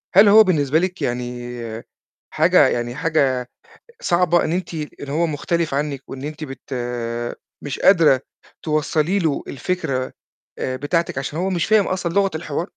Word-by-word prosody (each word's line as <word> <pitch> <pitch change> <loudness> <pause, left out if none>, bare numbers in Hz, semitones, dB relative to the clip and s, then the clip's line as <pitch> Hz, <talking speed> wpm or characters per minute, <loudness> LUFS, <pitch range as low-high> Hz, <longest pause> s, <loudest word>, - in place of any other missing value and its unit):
هل 200 +2 +8
هو 220 +2 +9
بالنسبة 155 -5 +2
لِك 185 +2 -2
يعني 120 0 -3 0.8
حاجة - - +5
يعني 120 +1 -2
حاجة 135 -6 +1 0.5
صعبة 175 0 +2
إن 160 - -1
أنتِ 180 -1 -3
إن 150 -2 -6
هو 160 +4 +1
مختلف 160 0 -1
عنِّك 140 -2 -2
وإن 135 - -7
أنتِ 155 +1 -5
بت 135 -1 -8 0.9
مش 145 - -4
قادرة 165 -9 +5 0.4
توصّلي 155 +4 +1
له 160 -6 0
الفكرة 140 -3 -2 0.5
آآ 130 - -2
بتاعتِك 145 +1 -1
عشان 140 +3 -4
هو 185 +2 0
مش 175 -3 0
فاهم 215 -2 +4
أصلًا 180 -2 -2
لغة 200 -1 +3
الحوار؟ 155 -1 -3
155 Hz, 150 wpm, -21 LUFS, 135-175 Hz, 0.9 s, هو